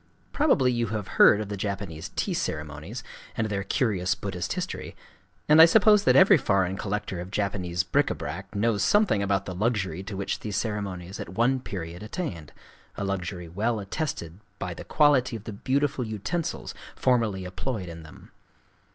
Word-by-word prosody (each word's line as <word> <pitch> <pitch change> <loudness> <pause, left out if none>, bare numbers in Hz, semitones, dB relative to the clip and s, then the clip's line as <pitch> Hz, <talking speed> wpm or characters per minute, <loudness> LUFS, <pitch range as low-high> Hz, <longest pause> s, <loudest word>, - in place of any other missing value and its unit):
Probably 155 - +3
you 120 -1 0
have 105 -3 -4
heard 105 - +8
of 105 - -5
the 105 - -3
Japanese 95 -5 -4
tea - - -1
ceremonies, 75 - -4 0.3
and 110 -2 +1
their 100 -1 -2
curious 95 -4 0
Buddhist - - -4
history; - - -5 0.5
and 155 +2 +8
I - - +12
suppose 210 +3 +5
that - - +5
every 190 0 +8
foreign 95 -4 +1
collector 100 -2 -3
of 90 +1 -6
Japanese 95 -3 -1
bric 90 - +2
à - - -2
brac 95 +4 -6
knows 105 0 +1
something 205 - +3
about 100 -1 0
the 90 - -5
luxury 95 -4 -1
to 95 0 -6
which 100 0 -2
these 105 -3 -4
ceremonies 100 -4 -4
at - - -6
one 120 +8 +2
period 90 -7 -6
attained,—a 100 - -7
luxury 90 -2 -3
well 110 +7 -1
attested 100 - -4 0.2
by - - -4
the - - -9
quality 140 -5 +3
of 110 - -7
the 110 - -6
beautiful 135 +5 0
utensils 110 - -3 0.2
formerly 115 -7 +1
employed 95 +2 -4
in 85 -1 -8
them. 80 -1 -14
100 Hz, 170 wpm, -26 LUFS, 95-120 Hz, 0.5 s, I